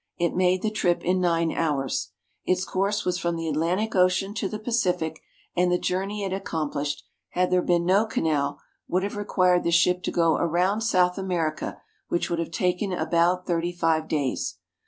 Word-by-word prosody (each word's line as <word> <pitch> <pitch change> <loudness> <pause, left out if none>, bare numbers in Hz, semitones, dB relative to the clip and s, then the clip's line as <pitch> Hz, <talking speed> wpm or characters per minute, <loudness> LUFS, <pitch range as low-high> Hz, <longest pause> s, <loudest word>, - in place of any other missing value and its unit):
It 170 0 0
made 185 0 +2
the 215 - 0
trip 180 -5 +1
in 185 +1 +1
nine 170 -2 +2
hours. 135 - -1 0.3
Its 185 +1 +1
course 200 +2 -1
was 180 0 0
from 170 0 -1
the 165 0 -3
Atlantic 175 +8 0
Ocean 185 +2 +2
to 200 -2 -2
the 215 - -4
Pacific, 180 -8 -1 0.3
and 180 0 +2
the 180 - +3
journey 195 +4 -2
it 195 - -2
accom 165 -6 -3
plished, 145 0 -2 0.3
had 180 0 0
there 180 0 +4
been 175 -1 +1
no 200 +5 +3
canal, 145 -7 0 0.3
would 185 +1 0
have 205 - -3
required 185 -3 +2
the - - +1
ship 180 +2 +3
to - - -2
go 165 -2 +3
around 180 +5 +1
South 180 -5 +2
America, 170 -5 -2 0.3
which 175 - -1
would 170 - 0
have 165 - -2
taken 180 +2 0
about 180 0 +1
thirty 175 -1 0
five 165 -2 0
days. 145 -5 -1
180 Hz, 185 wpm, -25 LUFS, 165-185 Hz, 0.3 s, there